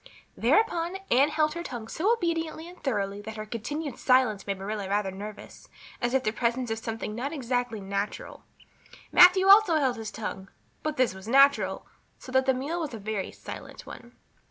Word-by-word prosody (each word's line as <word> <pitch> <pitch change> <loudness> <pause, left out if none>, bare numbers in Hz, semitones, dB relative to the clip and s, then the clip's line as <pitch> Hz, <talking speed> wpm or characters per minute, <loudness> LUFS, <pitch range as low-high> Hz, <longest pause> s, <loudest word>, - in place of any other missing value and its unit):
Thereupon 350 -4 +1
Anne 270 +4 +5
held 305 0 +1
her 340 - -5
tongue 240 -9 -6
so 370 - 0
obediently 330 -6 -1
and 355 +1 -14
thoroughly 205 -6 -2
that 220 +1 -8
her 215 - -5
continued 275 +7 -5
silence 250 -7 +2
made 200 -1 -2
Marilla 200 0 -4
rather 200 -1 0
nervous, 205 +2 -10 0.3
as 240 +2 0
if 265 - +3
in - - -18
the - - -19
presence 240 0 0
of 225 - -2
something 225 -1 -5
not 255 +6 -3
exactly 245 -5 -2
natural. 200 +1 -4 0.7
Matthew 365 +1 +7
also 400 -3 +7
held 265 -5 +1
his 220 -1 -5
tongue, 195 -3 -6 0.3
but 310 -1 -3
this 255 -6 +2
was 190 +2 -11
natural, 275 +3 +4 0.3
so 255 - -11
that 260 0 +2
the 265 - +5
meal 295 +7 -3
was 300 -8 -4
a - - -6
very 210 -2 -4
silent - - -10
one. 240 0 -12
250 Hz, 185 wpm, -27 LUFS, 215-310 Hz, 0.7 s, Matthew